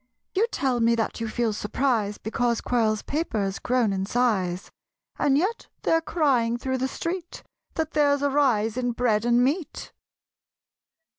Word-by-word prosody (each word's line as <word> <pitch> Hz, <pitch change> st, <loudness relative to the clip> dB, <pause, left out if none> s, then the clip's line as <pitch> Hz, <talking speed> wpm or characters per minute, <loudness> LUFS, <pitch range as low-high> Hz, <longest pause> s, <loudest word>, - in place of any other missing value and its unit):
You 420 Hz, +5 st, +2 dB
tell 260 Hz, -3 st, 0 dB
me 230 Hz, 0 st, +3 dB
that 230 Hz, 0 st, -2 dB
you 230 Hz, -, -1 dB
feel 230 Hz, -1 st, 0 dB
surprise 210 Hz, -1 st, 0 dB
Because 235 Hz, +2 st, -1 dB
Quirl's 220 Hz, -3 st, 0 dB
paper's 215 Hz, -, -2 dB
grown 245 Hz, -5 st, +1 dB
in 190 Hz, 0 st, -2 dB
size; 200 Hz, -7 st, 0 dB, 0.5 s
And 275 Hz, -1 st, +3 dB
yet 390 Hz, +9 st, -1 dB, 0.2 s
they're 325 Hz, 0 st, +3 dB
crying 260 Hz, -9 st, +1 dB
through 260 Hz, +1 st, -2 dB
the 260 Hz, -, 0 dB
street 340 Hz, +5 st, -5 dB, 0.3 s
That 320 Hz, -1 st, -1 dB
there's 285 Hz, -2 st, +2 dB
a 285 Hz, -, +2 dB
rise 240 Hz, -6 st, +2 dB
in 245 Hz, -1 st, 0 dB
bread 230 Hz, -2 st, +1 dB
and 240 Hz, +1 st, +4 dB
meat. 295 Hz, +5 st, -2 dB
245 Hz, 150 wpm, -25 LUFS, 220-285 Hz, 0.5 s, and